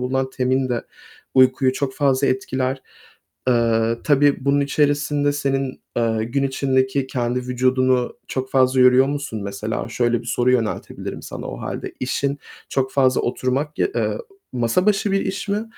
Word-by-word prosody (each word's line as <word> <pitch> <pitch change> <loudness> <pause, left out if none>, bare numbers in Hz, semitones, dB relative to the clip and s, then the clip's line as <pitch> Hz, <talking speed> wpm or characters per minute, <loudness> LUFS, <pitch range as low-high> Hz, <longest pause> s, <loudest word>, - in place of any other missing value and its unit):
bulunan 130 +1 -1
tein 130 0 0
de 120 -1 -1 0.5
uykuyu 130 0 +4
çok 130 0 -3
fazla 140 -1 +2
etkiler. 130 0 -1 0.7
Eee, 115 -1 +2
tabii 145 -2 +3
bunun 140 +1 +3
içerisinde 145 0 +1
senin, 135 -2 -2 0.2
eee, 110 -1 +1
gün 135 +4 -1
içindeki 130 0 +1
kendi 125 -1 -1
vücudunu 125 0 +1
çok 130 0 -3
fazla 130 -1 +3
yoruyor 125 +1 +6
musun 140 -7 -4
mesela? 105 +3 -4
Şöyle 120 0 +1
bir - - -14
soru 120 +2 +1
yöneltebilirim 115 -4 -3
sana - - -7
o - - -7
hâlde. - - -5
İşin 140 +2 -1 0.3
çok 130 -1 -1
fazla 130 -2 +3
oturmak 130 +4 -2
ya - - +2
eee, - - 0 0.3
masa 125 - +1
başı 205 -1 +2
bir 195 - +2
iş 195 +2 -4
mi 210 +2 0
130 Hz, 150 wpm, -21 LUFS, 125-140 Hz, 0.7 s, yoruyor